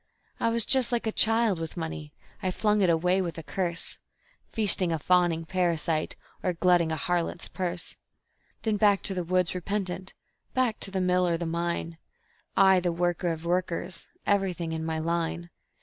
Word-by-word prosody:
I 230 Hz, -, +2 dB
was 230 Hz, -1 st, +3 dB
just 260 Hz, -3 st, +4 dB
like 240 Hz, -1 st, 0 dB
a 220 Hz, -, 0 dB
child 225 Hz, -4 st, +3 dB
with 165 Hz, +1 st, -6 dB
money; 160 Hz, -2 st, -5 dB, 0.3 s
I 190 Hz, -, 0 dB
flung 210 Hz, +2 st, +1 dB
it 185 Hz, -, +4 dB
away 180 Hz, +3 st, +2 dB
with 170 Hz, -3 st, -4 dB
a 165 Hz, -, -6 dB
curse, 170 Hz, +3 st, -3 dB, 0.5 s
Feasting 195 Hz, -5 st, +5 dB
a 165 Hz, -, 0 dB
fawning 170 Hz, 0 st, +2 dB
parasite, 165 Hz, -3 st, -1 dB, 0.3 s
or 180 Hz, -, 0 dB
glutting 175 Hz, -1 st, +3 dB
a -, -, 0 dB
harlot's 175 Hz, +2 st, -2 dB
purse; 180 Hz, -2 st, -4 dB, 0.7 s
Then 220 Hz, -2 st, 0 dB
back 205 Hz, -1 st, +3 dB
to 195 Hz, -, 0 dB
the 180 Hz, -1 st, -2 dB
woods 180 Hz, 0 st, +1 dB
repentant, 185 Hz, 0 st, -3 dB, 0.4 s
back 255 Hz, -4 st, +1 dB
to -, -, -3 dB
the 190 Hz, -1 st, -2 dB
mill 180 Hz, 0 st, +2 dB
or 170 Hz, -1 st, +1 dB
the 170 Hz, -, -4 dB
mine, 170 Hz, 0 st, -3 dB, 0.6 s
I, 190 Hz, -1 st, +6 dB
the 175 Hz, -1 st, 0 dB
worker 175 Hz, 0 st, 0 dB
of 165 Hz, 0 st, -6 dB
workers, 180 Hz, +1 st, -2 dB, 0.2 s
everything 185 Hz, -4 st, 0 dB
in 160 Hz, 0 st, -3 dB
my 160 Hz, 0 st, -2 dB
line. 170 Hz, +1 st, -2 dB
180 Hz, 175 wpm, -27 LUFS, 170-190 Hz, 0.7 s, I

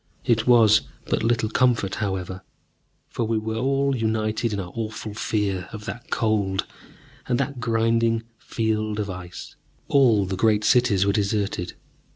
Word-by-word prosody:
It 115 Hz, -1 st, +2 dB
was 110 Hz, -3 st, +6 dB, 0.2 s
but -, -, 0 dB
little 115 Hz, -1 st, +1 dB
comfort, 115 Hz, -4 st, +1 dB
however, 95 Hz, -2 st, -3 dB, 0.7 s
for -, -, -3 dB
we 110 Hz, 0 st, 0 dB
were 110 Hz, +1 st, -3 dB
all 135 Hz, +2 st, +1 dB
united 110 Hz, 0 st, -1 dB
in 100 Hz, -, -2 dB
our 90 Hz, -2 st, -6 dB
awful 110 Hz, -1 st, -5 dB
fear 100 Hz, -3 st, -2 dB
of 110 Hz, -1 st, -8 dB
that 120 Hz, -, -7 dB
Cold 100 Hz, -4 st, 0 dB, 0.6 s
and 125 Hz, 0 st, +1 dB
that 140 Hz, -1 st, -2 dB
grinding 115 Hz, 0 st, +1 dB, 0.2 s
field 110 Hz, -1 st, -2 dB
of 100 Hz, -2 st, -2 dB
Ice. 90 Hz, -1 st, -9 dB, 0.3 s
All 120 Hz, -8 st, +4 dB
the 95 Hz, +1 st, -3 dB
great 105 Hz, +1 st, +2 dB
cities 110 Hz, -5 st, +3 dB
were 100 Hz, -, +2 dB
deserted. 100 Hz, -3 st, -1 dB
110 Hz, 150 wpm, -24 LUFS, 100-115 Hz, 0.7 s, was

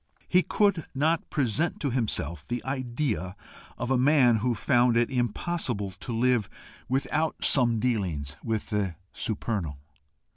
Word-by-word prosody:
He 180 Hz, -, +5 dB
could 200 Hz, -4 st, +1 dB
not 155 Hz, +4 st, +1 dB
present 145 Hz, +4 st, 0 dB
to 140 Hz, -, 0 dB
himself 105 Hz, -, -1 dB
the 120 Hz, 0 st, -3 dB
idea 125 Hz, -7 st, -2 dB, 0.4 s
of 125 Hz, -, -3 dB
a 130 Hz, -, +3 dB
man 130 Hz, -4 st, +5 dB
who 120 Hz, +2 st, 0 dB
found 120 Hz, +1 st, +3 dB
it 120 Hz, +2 st, +2 dB
impossible 120 Hz, -, -1 dB
to 105 Hz, +6 st, -8 dB
live 120 Hz, -2 st, +2 dB, 0.4 s
without 145 Hz, +4 st, 0 dB
some 120 Hz, -4 st, +4 dB
dealings 90 Hz, -, -1 dB
with 110 Hz, -1 st, -2 dB
the 100 Hz, -5 st, -1 dB, 0.2 s
supernal. 100 Hz, -, -2 dB
120 Hz, 135 wpm, -27 LUFS, 105-135 Hz, 0.4 s, He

